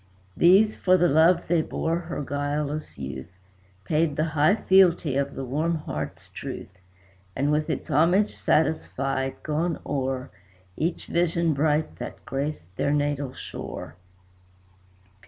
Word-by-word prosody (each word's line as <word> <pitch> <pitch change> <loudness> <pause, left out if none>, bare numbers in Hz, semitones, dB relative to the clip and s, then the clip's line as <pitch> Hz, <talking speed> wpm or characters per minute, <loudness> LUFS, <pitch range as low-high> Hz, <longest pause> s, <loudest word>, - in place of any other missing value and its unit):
These, 195 +5 +5
for 185 0 +3
the 175 - +4
love 165 +3 +4
they 170 -1 +3
bore 165 +1 -1
her 170 -3 -5
guileless 145 +2 -3
youth, 70 +6 -7 0.5
Paid 155 -1 +1
the 155 - +1
high 155 +6 +4
fealty 180 -8 +4
of 140 0 -1
the 135 - -4
warm 155 +6 0
heart's 75 - -6
truth; 95 -1 -8 0.6
And 140 +2 +1
with 150 0 0
its - - -3
homage 175 +8 +3
satisfied, 135 -3 0
gone 160 +2 -1
o'er 135 -1 -2 0.4
Each 165 +2 -2
vision 170 -1 +1
bright 150 +2 0
that - - -8
graced 135 - -4
their 140 - +1
natal 145 -2 -1
shore. - - -7
150 Hz, 130 wpm, -25 LUFS, 135-170 Hz, 0.6 s, These